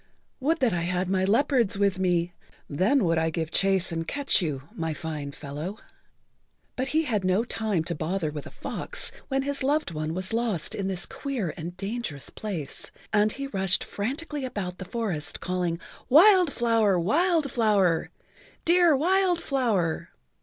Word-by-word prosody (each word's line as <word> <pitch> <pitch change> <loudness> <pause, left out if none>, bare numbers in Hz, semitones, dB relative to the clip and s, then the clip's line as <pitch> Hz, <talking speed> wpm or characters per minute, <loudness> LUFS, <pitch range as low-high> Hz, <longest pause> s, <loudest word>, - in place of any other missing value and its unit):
"Would 315 +5 +1
that 240 -6 +3
I 170 - 0
had 180 +2 -1
my 190 -1 +2
leopards 235 -1 +2
with 200 -1 +2
me. 175 -1 +1 0.3
Then[Pg 150 +6 0 0.2
42] - - +2
would 165 -1 +2
I 160 0 +1
give 160 0 -3
chase 195 -1 +2
and 165 0 -3
catch 280 -6 +2
you, 145 -5 -3
my 160 -2 -3
fine 150 -3 -5
fellow." 150 +8 -6 1.0
But 260 +1 -1
he 315 +4 +2
had 220 -9 -1
no 185 +4 +2
time 215 -7 -1
to 170 - -2
bother 165 +1 -2
with 150 -1 -7
a - - -8
fox - - -4 0.2
when 270 0 0
his 280 0 -3
loved 285 - +1
one 155 0 -3
was 185 +4 -3
lost 225 -9 -1
in 195 - -2
this 190 -2 -1
queer 250 - -3
and 175 +2 -7
dangerous 195 - -4
place, 180 -10 -6 0.2
and 210 0 +4
he 275 - -5
rushed 190 -7 +1
frantically 285 +7 -3
about 200 -8 -4
the 185 - -5
forest 185 -8 -3
calling, 180 -2 -1 0.3
"Wild 360 +3 +7
Flower! 225 -6 +2
Wild 310 - +2
Flower! 205 -8 +2 0.6
Dear 345 -3 +5
Wild 360 +3 +3
Flower!" 230 - 0
195 Hz, 165 wpm, -26 LUFS, 170-265 Hz, 1.0 s, Wild